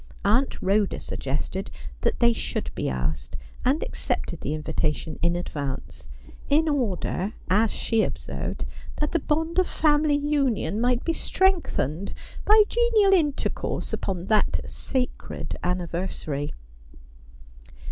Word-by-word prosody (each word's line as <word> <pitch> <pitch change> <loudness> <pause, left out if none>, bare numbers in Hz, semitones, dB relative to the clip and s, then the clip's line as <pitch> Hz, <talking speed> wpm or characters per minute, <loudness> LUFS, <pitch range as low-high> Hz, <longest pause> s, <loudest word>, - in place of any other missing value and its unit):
Aunt 240 +7 +3
Rhoda 200 +1 +2
suggested 150 +8 -3 0.3
that - - 0
they 235 -1 +5
should - - -3
be - - -1
asked, 65 +3 -2 0.3
and 270 +5 +2
accepted 170 - -2
the 150 - -1
invitation 155 +1 -2
in 170 0 +3
advance; 140 -6 -4 0.4
in 310 +3 +4
order, 215 - 0 0.2
as 215 +3 +4
she 225 +1 +1
observed, - - -3 0.3
that 300 - -1
the 335 - +2
bond 320 +4 0
of 370 - +3
family 300 -1 +3
union 270 - +1
might 245 0 +2
be 330 - +2
strengthened 325 - +1 0.3
by 430 0 +8
genial 455 -4 +4
intercourse 300 -7 0
upon 185 -2 -2
that 215 +1 +2
sacred 255 -2 -3
anniversary. 175 -5 -2
225 Hz, 115 wpm, -26 LUFS, -, 0.4 s, by